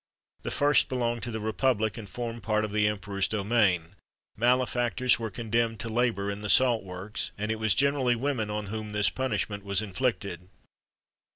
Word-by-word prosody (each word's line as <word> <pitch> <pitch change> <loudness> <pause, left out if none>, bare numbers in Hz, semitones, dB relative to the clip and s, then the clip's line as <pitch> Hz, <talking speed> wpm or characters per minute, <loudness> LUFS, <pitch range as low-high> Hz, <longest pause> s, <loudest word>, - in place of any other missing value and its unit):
The - - -4
first 145 0 +3
belonged 120 -2 -1
to 115 - -2
the 110 -1 -4
republic, 110 0 0
and 110 -4 -8
formed 120 +1 -5
part 110 +1 0
of 105 - -6
the 105 0 +2
emperor's 100 -2 -1
domain; 100 -5 +1 0.4
malefactors 120 0 +2
were 115 -1 -3
condemned 115 +1 -1
to 115 - -4
labour 110 -4 0
in 100 +1 -6
the 105 - -4
salt 120 +1 +4
works, 95 +3 -5
and 105 +1 -2
it 110 - -2
was 110 -2 +2
generally 140 -3 +2
women 120 -3 -1
on 105 0 -3
whom 105 +1 -5
this 105 0 +3
punishment 105 -5 -2
was 100 -1 0
inflicted. 100 -4 -2
110 Hz, 175 wpm, -28 LUFS, 100-120 Hz, 0.4 s, salt